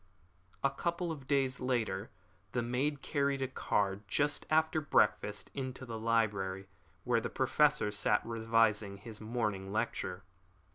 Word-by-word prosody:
A 140 - +3
couple 170 +4 -2
of 140 -5 -7
days 135 -2 +1
later 115 -5 -1 0.4
the 125 - 0
maid 135 +4 -1
carried 140 -2 0
a - - 0
card 100 -6 0
just 145 +7 0
after 160 0 +3
breakfast 105 -7 +1
into 130 -1 -5
the 115 -2 -5
library 105 -4 0 0.4
where 120 -2 +2
the - - -3
Professor 145 -2 +3
sat 105 0 +1
revising 115 -3 +2
his 110 +1 -10
morning 105 -4 -2
lecture. 100 -4 -2
115 Hz, 135 wpm, -33 LUFS, 105-140 Hz, 0.4 s, A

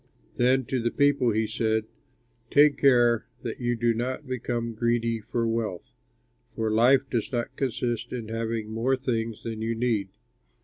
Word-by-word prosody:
Then 130 +1 +3
to 130 0 -1
the 120 - +1
people 140 -2 +2
he 110 0 +1
said, 110 0 0 0.6
"Take 145 0 +5
care 120 -4 +4 0.2
that 115 -3 -5
you 120 -1 0
do 120 0 +1
not 130 +5 -3
become 120 -2 -3
greedy 115 0 0
for 115 +2 -2
wealth, 115 -5 -3 0.6
for 110 -1 -1
life 130 +5 +4
does 120 -4 -2
not 120 -2 -3
consist 120 -3 -2
in 115 -3 -5
having 115 -1 -3
more 120 +4 +1
things 115 -4 -3
than 110 -1 -5
you 115 +1 -1
need." 115 -4 0
115 Hz, 160 wpm, -26 LUFS, 115-125 Hz, 0.6 s, Take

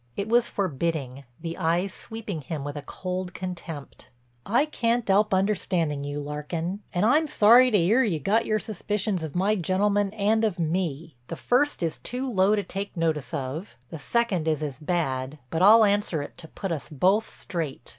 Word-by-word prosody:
It 200 - -2
was 235 +1 +3
forbidding, 145 -7 -2
the 165 0 -5
eyes 175 +3 0
sweeping 210 -7 -6
him 145 +1 -5
with 145 +1 -5
a 145 - -4
cold 185 +3 -5
contempt: 175 -5 -7 0.4
"I 240 +8 +3
can't 240 -5 0
'elp 205 +2 +3
understanding 185 -6 0
you, 145 +1 -4
Larkin, 160 +6 -4
and 180 +3 +1
I'm 305 +7 +4
sorry 250 -2 +6
to 215 - +3
'ear 205 +9 +4
you 185 -9 0
got 210 +9 +1
your 215 - +2
suspicions 210 -2 -2
of 160 -1 -6
my 195 +4 +2
gentleman 200 +2 +1
and 220 +1 +1
of 210 -5 +1
me. 165 -4 -2
The - - -5
first 250 - +1
is 165 -1 -2
too 255 +2 -4
low 200 -3 +3
to 205 - -1
take 195 0 -6
notice 155 -5 -1
of; 140 +8 -5 0.2
the 160 - -6
second 190 -2 0
is 155 -1 0
as 145 -2 -5
bad, 150 -4 -2
but 165 - -1
I'll 215 +3 +8
answer 200 -7 0
it - - -10
to 160 - -9
put 195 +3 -5
us 160 -1 -3
both 190 +9 +2
straight. 155 -9 -5
185 Hz, 185 wpm, -26 LUFS, 155-210 Hz, 0.4 s, I'll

